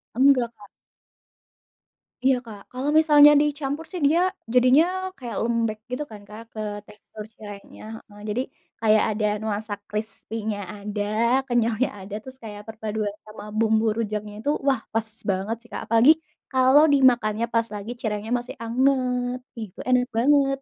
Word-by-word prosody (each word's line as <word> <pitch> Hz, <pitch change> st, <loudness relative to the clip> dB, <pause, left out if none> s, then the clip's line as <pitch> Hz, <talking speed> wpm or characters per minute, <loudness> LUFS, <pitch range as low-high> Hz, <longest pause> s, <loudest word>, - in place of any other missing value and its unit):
Enggak, 255 Hz, -2 st, +4 dB
Kak. 205 Hz, -, -14 dB, 1.6 s
Iya, 265 Hz, 0 st, +5 dB
Kak. 210 Hz, -3 st, -10 dB
Kalau 260 Hz, +3 st, -2 dB
misalnya 295 Hz, -2 st, +7 dB
dicampur 295 Hz, +1 st, -2 dB
sih, 360 Hz, -4 st, -5 dB
dia 320 Hz, +4 st, +3 dB, 0.3 s
jadinya 255 Hz, +5 st, +6 dB, 0.3 s
kayak 240 Hz, -4 st, -6 dB
lembek, 230 Hz, -2 st, 0 dB
gitu 255 Hz, +4 st, -2 dB
kan, 210 Hz, -1 st, -10 dB
Kak, 215 Hz, +2 st, -9 dB
ke 215 Hz, -, -7 dB, 0.3 s
tekstur 210 Hz, 0 st, -12 dB
cirengnya, 205 Hz, -2 st, -11 dB, 0.3 s
heeh. 205 Hz, -, -15 dB
Jadi, 230 Hz, +4 st, 0 dB, 0.4 s
kayak 215 Hz, -1 st, +4 dB
ada 215 Hz, 0 st, -1 dB, 0.2 s
nuansa 215 Hz, -1 st, -3 dB, 0.2 s
krispinya 215 Hz, 0 st, -4 dB, 0.2 s
ada, 205 Hz, 0 st, -5 dB, 0.5 s
kenyalnya 235 Hz, 0 st, +1 dB
ada, 195 Hz, +1 st, -10 dB
terus 260 Hz, +2 st, -12 dB
kayak 210 Hz, -2 st, -8 dB
perpaduan 215 Hz, -1 st, -3 dB
sama 215 Hz, 0 st, -11 dB
bumbu 220 Hz, 0 st, +3 dB
rujaknya 210 Hz, -2 st, -3 dB
itu, 285 Hz, -, -2 dB, 0.2 s
wah, 265 Hz, -5 st, +2 dB
pas 225 Hz, 0 st, 0 dB, 0.2 s
banget 195 Hz, +4 st, -1 dB
sih, 235 Hz, -, -15 dB
Kak. -, -, -5 dB
Apalagi 230 Hz, +6 st, +6 dB, 0.4 s
kalau 260 Hz, +3 st, +5 dB
dimakannya 240 Hz, -5 st, +3 dB
pas 230 Hz, 0 st, +2 dB
lagi 205 Hz, +3 st, -6 dB
cirengnya 215 Hz, +1 st, -3 dB
masih 245 Hz, -, -8 dB
anget, 250 Hz, 0 st, +1 dB, 0.2 s
ih, 225 Hz, -, -4 dB
itu -, -, -20 dB
enak 250 Hz, 0 st, +3 dB
banget. 275 Hz, +2 st, +3 dB
230 Hz, 150 wpm, -24 LUFS, 215-260 Hz, 1.6 s, misalnya